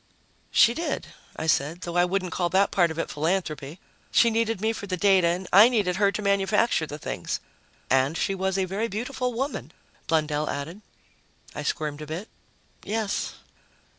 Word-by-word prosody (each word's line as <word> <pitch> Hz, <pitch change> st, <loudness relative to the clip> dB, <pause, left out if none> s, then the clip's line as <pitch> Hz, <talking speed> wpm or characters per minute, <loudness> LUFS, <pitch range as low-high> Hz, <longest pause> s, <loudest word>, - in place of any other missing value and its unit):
"She 230 Hz, +1 st, +5 dB
did," 335 Hz, +6 st, -3 dB, 0.3 s
I -, -, -4 dB
said. 160 Hz, +2 st, +1 dB
"Though 170 Hz, -1 st, -5 dB
I 175 Hz, 0 st, +5 dB
wouldn't 185 Hz, -1 st, -1 dB
call 175 Hz, 0 st, 0 dB
that 195 Hz, +3 st, +3 dB
part 175 Hz, -3 st, +3 dB
of 160 Hz, -, -6 dB
it 165 Hz, -, -2 dB
philanthropy. 155 Hz, -1 st, -2 dB, 0.3 s
She 235 Hz, -, +4 dB
needed 225 Hz, -2 st, 0 dB
me 220 Hz, +2 st, 0 dB
for 200 Hz, -, -7 dB
the 185 Hz, -1 st, -2 dB
data 190 Hz, -2 st, +4 dB
and 175 Hz, +2 st, -1 dB
I 210 Hz, +5 st, +9 dB
needed 200 Hz, -7 st, +1 dB
her 200 Hz, -1 st, +3 dB
to 210 Hz, -, -4 dB
manufacture 200 Hz, -2 st, +2 dB
the 150 Hz, -, -6 dB
things." -, -, -4 dB, 0.5 s
"And 135 Hz, +4 st, +2 dB
she 195 Hz, -, 0 dB
was 190 Hz, 0 st, -1 dB
a 190 Hz, -, +1 dB
very 200 Hz, +5 st, -2 dB
beautiful 250 Hz, +4 st, -3 dB
woman," 265 Hz, +5 st, -3 dB, 0.4 s
Blundell 155 Hz, -2 st, 0 dB
added. 160 Hz, +8 st, -5 dB, 0.7 s
I -, -, -5 dB
squirmed 150 Hz, -1 st, -2 dB
a 150 Hz, -, -7 dB
bit. 170 Hz, +8 st, -6 dB, 0.5 s
"Yes." 215 Hz, -1 st, -2 dB
190 Hz, 175 wpm, -26 LUFS, 160-210 Hz, 0.7 s, I